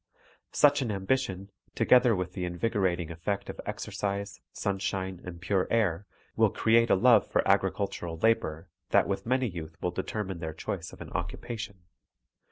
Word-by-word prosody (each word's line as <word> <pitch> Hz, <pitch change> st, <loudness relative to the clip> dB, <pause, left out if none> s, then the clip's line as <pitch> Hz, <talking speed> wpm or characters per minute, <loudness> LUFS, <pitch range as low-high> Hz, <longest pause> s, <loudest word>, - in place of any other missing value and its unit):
Such 145 Hz, -1 st, +4 dB
an 120 Hz, -4 st, -1 dB
ambition, 100 Hz, -1 st, -1 dB, 0.2 s
together 125 Hz, -2 st, +5 dB
with 90 Hz, -1 st, -3 dB
the 90 Hz, -, -4 dB
invigora 95 Hz, 0 st, 0 dB
ting 85 Hz, -2 st, -5 dB
effect 100 Hz, +5 st, -3 dB
of -, -, -9 dB
exercise, 100 Hz, -1 st, -3 dB
sunshine, 95 Hz, -2 st, -2 dB
and 90 Hz, -1 st, -8 dB
pure 90 Hz, +1 st, 0 dB
air, 100 Hz, -4 st, +1 dB, 0.3 s
will -, -, +4 dB
create 115 Hz, +1 st, +3 dB
a -, -, +6 dB
love 115 Hz, +1 st, +5 dB
for -, -, +1 dB
agricultural 85 Hz, -4 st, 0 dB
labor 80 Hz, -6 st, +1 dB, 0.2 s
that -, -, +4 dB
with 100 Hz, +3 st, -3 dB
many 130 Hz, +1 st, +2 dB
youth 80 Hz, -4 st, -7 dB
will 90 Hz, -, -1 dB
determine 95 Hz, 0 st, -4 dB
their 80 Hz, -1 st, -4 dB
choice -, -, -4 dB
of -, -, -13 dB
an -, -, -8 dB
occupation. 110 Hz, -5 st, -5 dB
95 Hz, 160 wpm, -29 LUFS, 90-110 Hz, 0.3 s, a